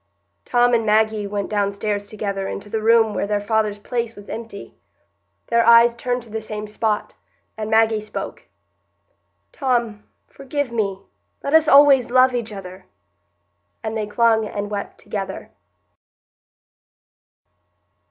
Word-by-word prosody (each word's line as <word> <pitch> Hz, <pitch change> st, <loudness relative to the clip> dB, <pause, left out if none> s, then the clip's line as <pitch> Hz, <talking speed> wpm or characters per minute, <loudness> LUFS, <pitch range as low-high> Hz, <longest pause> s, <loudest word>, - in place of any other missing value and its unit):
Tom 245 Hz, 0 st, +3 dB
and 230 Hz, -1 st, +3 dB
Maggie 215 Hz, -1 st, +2 dB
went 200 Hz, -1 st, -3 dB
downstairs 205 Hz, 0 st, -2 dB
together 200 Hz, -2 st, -4 dB
into 200 Hz, +1 st, -7 dB
the 220 Hz, -, -1 dB
room 225 Hz, -1 st, +4 dB
where 200 Hz, -, -2 dB
their 205 Hz, 0 st, 0 dB
father's 215 Hz, 0 st, 0 dB
place 230 Hz, +2 st, -4 dB
was 205 Hz, 0 st, -13 dB
empty. 225 Hz, -3 st, -8 dB, 0.8 s
Their 235 Hz, 0 st, +3 dB
eyes 235 Hz, 0 st, +6 dB
turned 245 Hz, 0 st, -2 dB
to 230 Hz, -, -15 dB
the 220 Hz, 0 st, -4 dB
same 215 Hz, -1 st, -6 dB
spot, 210 Hz, 0 st, -2 dB, 0.4 s
and 215 Hz, -1 st, -5 dB
Maggie 220 Hz, -1 st, +3 dB
spoke,— 215 Hz, -, -7 dB, 1.0 s
"Tom, 235 Hz, -6 st, -1 dB, 0.2 s
forgive 275 Hz, -1 st, -4 dB
me—let 195 Hz, -, -5 dB
us 320 Hz, -1 st, +5 dB
always 275 Hz, -4 st, +6 dB
love 255 Hz, +1 st, +4 dB
each 235 Hz, -3 st, -3 dB
other"; 190 Hz, -2 st, -10 dB, 1.0 s
and 220 Hz, 0 st, -3 dB
they 215 Hz, -1 st, -2 dB
clung 220 Hz, 0 st, +2 dB
and 205 Hz, 0 st, -5 dB
wept 205 Hz, -1 st, -5 dB
together. 195 Hz, -2 st, -6 dB
220 Hz, 130 wpm, -21 LUFS, 205-235 Hz, 1.0 s, eyes